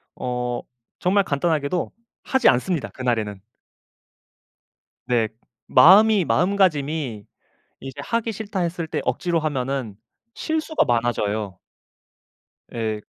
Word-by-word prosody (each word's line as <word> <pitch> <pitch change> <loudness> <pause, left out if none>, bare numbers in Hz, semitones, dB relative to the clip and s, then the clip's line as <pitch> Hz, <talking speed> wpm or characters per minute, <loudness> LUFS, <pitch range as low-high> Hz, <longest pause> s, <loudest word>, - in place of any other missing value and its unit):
어 125 -1 -3 0.4
정말 195 +2 +2
간단하게도 155 +2 -1 0.3
하지 265 -1 +3
않습니다 150 +5 0
그날에는. 115 -6 -2 1.7
네. 120 -3 +1 0.4
마음이 195 +7 +6
마음가짐이 155 - +1 0.6
이제 135 -1 -8
'하기 230 -1 -1
싫다.' 205 -2 -4
했을 170 -1 -2
때 - - -3
억지로 175 -2 0
하면은 135 -7 -3 0.4
실수가 315 0 -1
많아져요. 110 -5 -1 1.2
예. 110 -2 -2
140 Hz, 230 characters per minute, -22 LUFS, 120-185 Hz, 1.7 s, 마음이